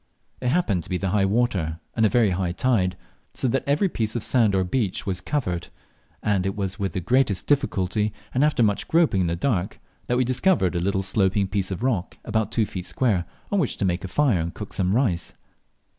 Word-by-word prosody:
It 125 Hz, -, -2 dB
happened 125 Hz, -, +1 dB
to -, -, -10 dB
be 90 Hz, -, 0 dB
high 95 Hz, +1 st, +1 dB
water, 95 Hz, -7 st, 0 dB, 0.2 s
and 110 Hz, -1 st, +4 dB
a -, -, -1 dB
very 115 Hz, -4 st, +3 dB
high 90 Hz, -1 st, -1 dB
tide, 95 Hz, -4 st, +1 dB, 0.4 s
so -, -, 0 dB
that 135 Hz, -, 0 dB
every 145 Hz, +8 st, +3 dB
piece 110 Hz, -, -2 dB
of 120 Hz, -, -2 dB
sand 110 Hz, -6 st, +3 dB
or 95 Hz, -, +2 dB
beach 110 Hz, +2 st, -1 dB
was 95 Hz, -3 st, -2 dB
covered, 90 Hz, -, -2 dB, 0.6 s
and 100 Hz, -3 st, +1 dB
it 95 Hz, +1 st, -2 dB
was 100 Hz, 0 st, -3 dB
with 100 Hz, -1 st, -2 dB
the 95 Hz, -, -1 dB
greatest 120 Hz, +1 st, +1 dB
difficulty, 105 Hz, -7 st, +1 dB, 0.2 s
and 130 Hz, -, +2 dB
after 150 Hz, -5 st, +3 dB
much 105 Hz, -2 st, +1 dB
groping 160 Hz, -, +3 dB
in 90 Hz, -, +1 dB
the 85 Hz, -, 0 dB
dark, 95 Hz, -1 st, -1 dB, 0.3 s
that 125 Hz, -, +1 dB
we 130 Hz, -, +3 dB
discovered 130 Hz, -, +2 dB
a -, -, +1 dB
little 95 Hz, +2 st, 0 dB
sloping 95 Hz, 0 st, +1 dB
piece 95 Hz, -1 st, -1 dB
of 95 Hz, +4 st, -4 dB
rock 110 Hz, -8 st, -1 dB
about 110 Hz, -1 st, -1 dB
two 110 Hz, -, +1 dB
feet 90 Hz, -3 st, -6 dB
square 105 Hz, -9 st, +1 dB, 0.3 s
on 200 Hz, -, +2 dB
which 150 Hz, -, 0 dB
to 100 Hz, -, 0 dB
make 90 Hz, -1 st, -1 dB
a -, -, -3 dB
fire 120 Hz, 0 st, +2 dB
and 85 Hz, +1 st, -3 dB
cook 105 Hz, -, -7 dB
some 95 Hz, +1 st, +1 dB
rice. 115 Hz, -10 st, 0 dB
100 Hz, 220 wpm, -24 LUFS, 95-125 Hz, 0.6 s, and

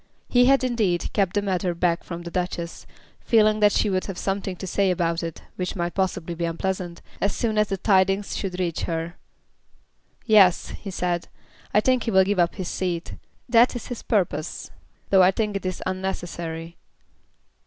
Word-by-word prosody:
He 245 Hz, 0 st, +5 dB
had, 270 Hz, +1 st, +4 dB
indeed, 220 Hz, -9 st, 0 dB
kept 195 Hz, -3 st, +1 dB
the 205 Hz, -, +1 dB
matter 185 Hz, -2 st, -1 dB
back 170 Hz, 0 st, +1 dB
from 170 Hz, -1 st, -7 dB
the 170 Hz, -, -7 dB
Duchess, 175 Hz, -2 st, -4 dB, 0.3 s
feeling 215 Hz, -2 st, +3 dB
that 210 Hz, -1 st, +5 dB
she -, -, +2 dB
would 185 Hz, -2 st, 0 dB
have 195 Hz, -3 st, -6 dB
something 195 Hz, -1 st, -2 dB
to 190 Hz, -, -7 dB
say 195 Hz, +1 st, +1 dB
about 170 Hz, -2 st, 0 dB
it, 165 Hz, -2 st, -6 dB
which 180 Hz, -1 st, -3 dB
might 175 Hz, -2 st, -2 dB
possibly 185 Hz, -3 st, -1 dB
be 170 Hz, +1 st, -4 dB
unpleasant, 175 Hz, +1 st, -3 dB, 0.2 s
as 200 Hz, -, +1 dB
soon 225 Hz, -2 st, -1 dB
as 210 Hz, 0 st, +3 dB
the 195 Hz, -, -1 dB
tidings 195 Hz, 0 st, +2 dB
should 185 Hz, -2 st, -4 dB
reach 170 Hz, -3 st, -1 dB
her. 165 Hz, 0 st, -3 dB, 1.1 s
"Yes," 205 Hz, -6 st, +5 dB
he 200 Hz, -, -7 dB
said, 180 Hz, -2 st, -2 dB, 0.4 s
"I 210 Hz, -, +4 dB
think 255 Hz, +1 st, +2 dB
he -, -, 0 dB
will 190 Hz, -1 st, +6 dB
give 200 Hz, 0 st, 0 dB
up 175 Hz, -1 st, +2 dB
his 185 Hz, -3 st, -4 dB
seat. 175 Hz, -3 st, -3 dB, 0.3 s
That 240 Hz, +1 st, +5 dB
is 245 Hz, -, -6 dB
his 245 Hz, -, -5 dB
purpose, 175 Hz, -7 st, -1 dB, 0.4 s
though 190 Hz, -1 st, +7 dB
I 180 Hz, -, +7 dB
think 210 Hz, +1 st, -1 dB
it 195 Hz, -1 st, -2 dB
is 185 Hz, -, -4 dB
unnecessary." 170 Hz, -3 st, -4 dB
185 Hz, 185 wpm, -24 LUFS, 175-205 Hz, 1.1 s, though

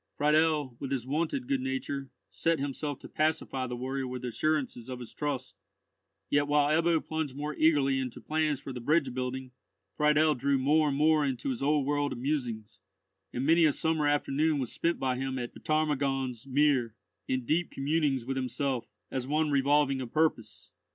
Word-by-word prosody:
Friedel, 150 Hz, -3 st, +2 dB
with 135 Hz, -, -4 dB
his 130 Hz, -3 st, -2 dB
wonted 170 Hz, -, -1 dB
good 275 Hz, -1 st, 0 dB
nature, 250 Hz, -, -3 dB, 0.2 s
set 165 Hz, 0 st, +1 dB
himself 145 Hz, 0 st, -3 dB
to -, -, -9 dB
pacify 150 Hz, -4 st, -1 dB
the 125 Hz, -, -4 dB
warrior 130 Hz, +2 st, -3 dB
with 125 Hz, 0 st, -5 dB
assurances 130 Hz, 0 st, -1 dB
of 130 Hz, -, -4 dB
his 120 Hz, -2 st, -9 dB
trust; 135 Hz, -4 st, -4 dB, 0.7 s
yet 145 Hz, 0 st, +2 dB
while 145 Hz, 0 st, +3 dB
Ebbo 165 Hz, -1 st, +1 dB
plunged 155 Hz, -4 st, -3 dB
more 150 Hz, +1 st, -3 dB
eagerly 145 Hz, -4 st, +3 dB
into 130 Hz, -2 st, -4 dB
plans 155 Hz, -2 st, 0 dB
for 135 Hz, -, -7 dB
the 125 Hz, -, -5 dB
bridge 145 Hz, 0 st, +2 dB
building, 130 Hz, 0 st, -4 dB, 0.4 s
Friedel 150 Hz, +1 st, +4 dB
drew 140 Hz, +1 st, +1 dB
more 150 Hz, +4 st, +3 dB
and 140 Hz, -1 st, 0 dB
more 155 Hz, 0 st, +4 dB
into 135 Hz, -2 st, -2 dB
his 125 Hz, -, -4 dB
old 145 Hz, 0 st, +2 dB
world 145 Hz, 0 st, 0 dB
of -, -, -7 dB
musings; 120 Hz, -5 st, -3 dB, 0.5 s
and 125 Hz, +2 st, -2 dB
many 165 Hz, +2 st, +5 dB
a 155 Hz, -, +6 dB
summer 160 Hz, 0 st, 0 dB
afternoon 145 Hz, +1 st, +1 dB
was 130 Hz, -4 st, -2 dB
spent 170 Hz, 0 st, 0 dB
by 130 Hz, -1 st, -1 dB
him 135 Hz, 0 st, -2 dB
at 120 Hz, -1 st, -4 dB
the -, -, -12 dB
Ptarmigan's 140 Hz, -5 st, -1 dB
Mere, 135 Hz, -5 st, +2 dB, 0.3 s
in 130 Hz, -1 st, -1 dB
deep 165 Hz, +6 st, +1 dB
communings 140 Hz, -3 st, 0 dB
with 135 Hz, +1 st, -2 dB
himself, 130 Hz, -1 st, -2 dB, 0.2 s
as 130 Hz, -1 st, -3 dB
one 155 Hz, +1 st, +1 dB
revolving 140 Hz, -1 st, +3 dB
a 125 Hz, -, -4 dB
purpose. 155 Hz, -4 st, -1 dB
140 Hz, 180 wpm, -29 LUFS, 130-155 Hz, 0.7 s, a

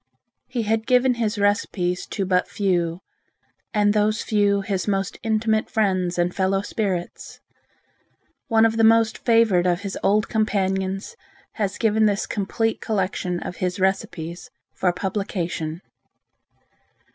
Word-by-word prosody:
He 245 Hz, -2 st, -2 dB
had 220 Hz, +1 st, -1 dB
given 250 Hz, 0 st, +4 dB
his 215 Hz, -1 st, 0 dB
recipes 200 Hz, -3 st, 0 dB
to 195 Hz, -, -3 dB
but 180 Hz, -1 st, +1 dB
few, 175 Hz, -3 st, -1 dB, 0.7 s
and 205 Hz, -2 st, +3 dB
those 215 Hz, +1 st, +1 dB
few 205 Hz, -2 st, +2 dB
his 195 Hz, -2 st, -2 dB
most 195 Hz, -1 st, -1 dB
intimate 220 Hz, 0 st, 0 dB
friends 185 Hz, -6 st, 0 dB
and 175 Hz, 0 st, +1 dB
fellow 195 Hz, +1 st, 0 dB
spirits. 190 Hz, -5 st, -4 dB, 1.1 s
One 225 Hz, -1 st, +4 dB
of 225 Hz, 0 st, +1 dB
the 225 Hz, -, +3 dB
most 225 Hz, 0 st, +4 dB
favored 225 Hz, -7 st, +3 dB
of 175 Hz, +1 st, +1 dB
his 200 Hz, -2 st, -5 dB
old 210 Hz, +1 st, +2 dB
companions 195 Hz, -, -1 dB, 0.4 s
has 205 Hz, -3 st, -2 dB
given 220 Hz, -1 st, +3 dB
this 200 Hz, -1 st, 0 dB
complete 225 Hz, +2 st, -1 dB
collection 185 Hz, -3 st, -1 dB
of -, -, -6 dB
his 180 Hz, +2 st, -2 dB
recipes 185 Hz, +1 st, -2 dB, 0.2 s
for 180 Hz, -, +1 dB
publication. 175 Hz, -4 st, -3 dB
200 Hz, 130 wpm, -23 LUFS, 185-220 Hz, 1.1 s, given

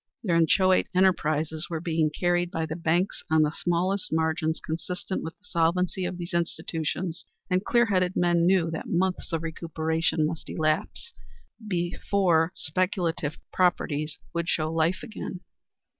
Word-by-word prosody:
Their 175 Hz, -6 st, +1 dB
inchoate 185 Hz, +3 st, +4 dB
enterprises 160 Hz, -4 st, +2 dB
were 165 Hz, -2 st, -2 dB
being 160 Hz, -2 st, +1 dB
carried 175 Hz, +2 st, +1 dB
by 165 Hz, -2 st, -2 dB
the 160 Hz, 0 st, -4 dB
banks 175 Hz, +3 st, 0 dB
on 160 Hz, 0 st, +5 dB
the 150 Hz, -, +1 dB
smallest 180 Hz, +4 st, -1 dB
margins 160 Hz, 0 st, 0 dB
consistent 180 Hz, +4 st, -4 dB
with 160 Hz, 0 st, -7 dB
the 205 Hz, -, -26 dB
solvency 180 Hz, +1 st, +1 dB
of 180 Hz, 0 st, -3 dB
those 175 Hz, +1 st, -6 dB
institutions, 170 Hz, 0 st, -2 dB, 0.3 s
and 185 Hz, +1 st, +2 dB
clear 235 Hz, +2 st, +3 dB
headed 185 Hz, -4 st, +1 dB
men 175 Hz, -1 st, +3 dB
knew 180 Hz, -3 st, +3 dB
that 160 Hz, -, -5 dB
months 185 Hz, +2 st, 0 dB
of 165 Hz, -1 st, -1 dB
recuperation 160 Hz, -1 st, 0 dB
must 160 Hz, +1 st, -4 dB
elapse 155 Hz, -, -1 dB, 0.5 s
before 175 Hz, -2 st, +1 dB
speculative 165 Hz, -2 st, -1 dB, 0.2 s
properties 155 Hz, -4 st, +1 dB, 0.2 s
would 170 Hz, 0 st, -1 dB
show 155 Hz, -1 st, 0 dB
life 165 Hz, +3 st, +1 dB
again. 195 Hz, -4 st, -6 dB
170 Hz, 145 wpm, -27 LUFS, 160-180 Hz, 0.5 s, on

